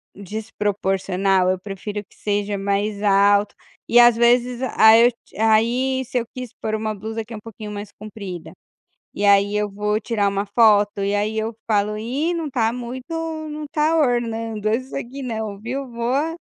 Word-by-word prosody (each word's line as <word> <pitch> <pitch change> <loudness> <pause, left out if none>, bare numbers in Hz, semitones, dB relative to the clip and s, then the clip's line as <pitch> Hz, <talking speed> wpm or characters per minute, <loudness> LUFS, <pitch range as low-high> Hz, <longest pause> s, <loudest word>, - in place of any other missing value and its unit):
desproporcional, 195 -2 -1
eu 185 - 0
prefiro 205 +2 -6
que - - -25
seja 205 -1 -2
mais 200 +1 -1
alto, 200 +1 +4 0.3
e 240 - +5
às 240 -1 +7
vezes 240 +1 +2 0.2
aí 225 +2 +8
eu 245 - +1 0.3
aí 245 +4 +2
se 255 - -3
eu 230 - -4
quis 255 -3 -7
pôr 215 - -2
uma 215 0 -2
blusa 220 +2 -5
que 230 - -10
é - - -5
um - - -8
pouquinho 215 -1 -8
mais 205 0 -6
comprida. 200 -5 -9 0.6
E 205 - -2
aí 200 +1 +4
eu 210 0 0
vou 210 +1 -1
tirar 215 -3 0
uma 200 +1 -1
foto 205 -1 +3
e 200 +1 0
aí 210 +2 -1
eu 220 0 -3
falo: 210 -1 +1
"Ih, 270 +10 -1
não 330 -2 -3
está 235 -5 +1
muito 250 +4 -7 0.4
não 300 0 -6
está 305 +2 +1
ornando 230 -6 0
isso 255 +5 -2
aqui 275 +1 -6
não, 220 -5 -4
viu"? 255 +4 -5
Vou, 265 +8 -1
220 Hz, 175 wpm, -21 LUFS, 205-240 Hz, 0.6 s, aí